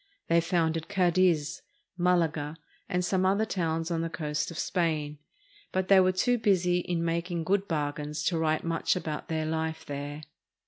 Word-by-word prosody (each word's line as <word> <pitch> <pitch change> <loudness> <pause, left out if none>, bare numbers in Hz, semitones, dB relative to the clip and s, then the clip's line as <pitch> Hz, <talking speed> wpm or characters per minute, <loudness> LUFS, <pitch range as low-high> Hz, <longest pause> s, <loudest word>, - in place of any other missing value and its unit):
They 170 0 +5
founded 165 -1 0
Cadiz, 180 -5 +2 0.3
Malaga, 165 -4 +1 0.3
and 180 -2 0
some 185 0 +1
other 200 +3 +3
towns 165 -4 -1
on 165 -1 0
the 165 - -2
coast 150 -2 -2
of 170 - -8
Spain; 155 -5 -1 0.5
but 185 0 -1
they 195 -1 +8
were 185 0 +4
too 240 +6 +1
busy 180 -4 +3
in 170 -1 -2
making 170 0 -1
good 195 +4 +1
bargains 150 -1 -2
to 170 0 +1
write 155 -1 +1
much 165 0 0
about 155 -4 -4
their 160 -1 -1
life 160 0 -2
there. 145 +1 -5
165 Hz, 165 wpm, -28 LUFS, 155-180 Hz, 0.5 s, they